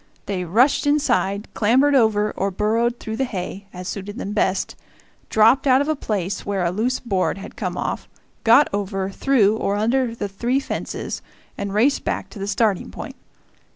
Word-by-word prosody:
They 185 -3 -2
rushed 245 - +3
inside, 240 -8 +1
clambered 260 +7 +3
over 215 -5 +3
or 195 - -1
burrowed 225 +5 0
through 220 0 -5
the 265 - +1
hay, 195 -3 -5
as 180 0 -8
suited 205 +2 -5
them 205 -5 -4
best, 195 -2 0 0.5
dropped 225 +6 +4
out 260 0 +6
of 285 - 0
a 310 - +1
place 200 - -3
where 195 -3 -1
a 170 - +1
loose 235 +7 0
board 195 -5 -1
had 195 - -9
come - - -3
off, - - -3 0.3
got 235 +6 +6
over, 195 -1 -2
through, 220 -3 +3
or 200 -2 0
under 230 +3 +1
the 205 - -3
three 240 +7 0
fences, 275 - -4 0.3
and 200 -1 -4
raced 260 +7 +3
back - - -3
to 210 - -10
the 195 - -3
starting 205 -2 +1
point. - - -8
215 Hz, 180 wpm, -22 LUFS, 195-250 Hz, 0.5 s, out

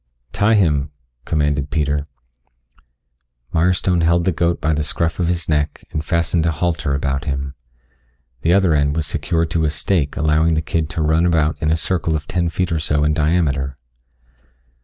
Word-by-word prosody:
"Tie 105 +7 +2
him," 75 -8 +2 0.4
commanded 75 -2 0
Peter. 75 -1 -1 1.5
Mirestone 90 +1 +2
held 85 +1 +3
the 95 - +2
goat 85 0 0
by 80 +1 0
the 75 - 0
scruff 85 +3 -1
of 85 - +1
his 85 -2 -1
neck 75 -1 -1
and 75 - -3
fastened 85 +1 0
a - - +2
halter 80 -3 -1
about 70 0 -2
him. 70 -1 -3 0.9
The 85 - +2
other 95 -3 +4
end 70 -1 +1
was 80 -1 0
secured 80 +2 -1
to 80 -1 +1
a - - +2
stake 75 0 -1
allowing 80 +2 +2
the 80 - +1
kid 80 0 -1
to 85 -2 -2
run 80 +3 +2
about 80 -2 +2
in 80 - +1
a 80 - +3
circle 80 -1 -1
of 75 -1 -3
ten 85 -2 0
feet 90 +2 -2
or 80 - 0
so 75 -1 0
in 75 0 +2
diameter. 75 -4 0
80 Hz, 180 wpm, -19 LUFS, 75-85 Hz, 1.5 s, other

